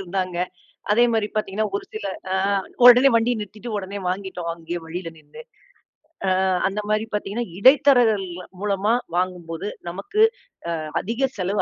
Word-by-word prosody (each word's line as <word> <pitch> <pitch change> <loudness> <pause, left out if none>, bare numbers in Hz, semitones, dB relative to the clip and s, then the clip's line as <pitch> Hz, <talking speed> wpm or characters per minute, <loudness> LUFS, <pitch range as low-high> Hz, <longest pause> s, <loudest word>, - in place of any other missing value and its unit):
இருந்தாங்க. 185 -1 -3 0.6
அதே 235 +3 +5
மாரி 220 -2 +1
பாத்தீங்கன்னா 215 0 -1
ஒரு - - -6
சில 215 -2 -5 0.3
அ - - +1 0.5
ஒடனே 250 +2 +9
வண்டிய 230 +2 +3
நிறுத்திட்டு 210 +3 -8
ஒடனே 200 0 -5
வாங்கிட்டோம் 185 -2 -3
அங்கயே 170 +1 -5
வழியில 165 +2 -5
நின்னு. 150 -2 -14 1.1
அ - - +2 0.2
அந்த 200 +2 -3
மாரி 215 +1 +1
பாத்தீங்கன்னா 210 +3 -2
இடைத்தரகள் 245 -5 +5 0.3
மூலமா 205 +1 +1 0.2
வாங்கும்போது 180 0 -2 0.2
நமக்கு 405 - -3 0.6
அ - - -5 0.2
அதிக 235 +7 -1
செலவு 195 +2 0
200 Hz, 135 wpm, -23 LUFS, 185-225 Hz, 1.1 s, ஒடனே